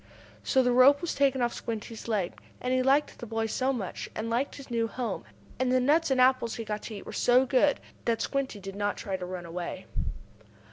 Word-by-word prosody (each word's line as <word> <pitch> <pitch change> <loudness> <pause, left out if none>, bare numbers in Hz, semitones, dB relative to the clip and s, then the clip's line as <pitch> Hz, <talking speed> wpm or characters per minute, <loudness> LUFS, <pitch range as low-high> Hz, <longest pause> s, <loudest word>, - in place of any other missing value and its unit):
So 260 -1 +3
the 250 - +3
rope 260 +3 +7
was 345 - -2
taken 270 -2 +2
off 240 - +1
Squinty's 225 0 -6
leg. 205 -6 0 0.3
And 250 0 -1
he 255 - +3
liked 275 +3 +2
the 240 - -7
boy 225 0 -1
so 255 +4 0
much, 220 -8 -4
and 225 +1 -3
liked 250 +4 0
his 275 -3 -11
new 230 -1 +1
home, 230 - -4 0.3
and 255 -1 +1
the 255 - +4
nuts 300 +6 +3
and 265 -1 +2
apples 255 -2 +4
he 230 - -5
got 210 0 -3
to 220 - -7
eat 200 - -8
were - - -8
so 250 +2 +4
good, 270 +2 +3 0.3
that 230 -1 +1
Squinty 275 -6 -2
did 195 0 -7
not 205 0 -1
try 195 -3 -3
to 185 -1 -4
run 180 -1 -6
away. 170 +1 -5
240 Hz, 225 wpm, -29 LUFS, 215-265 Hz, 0.3 s, rope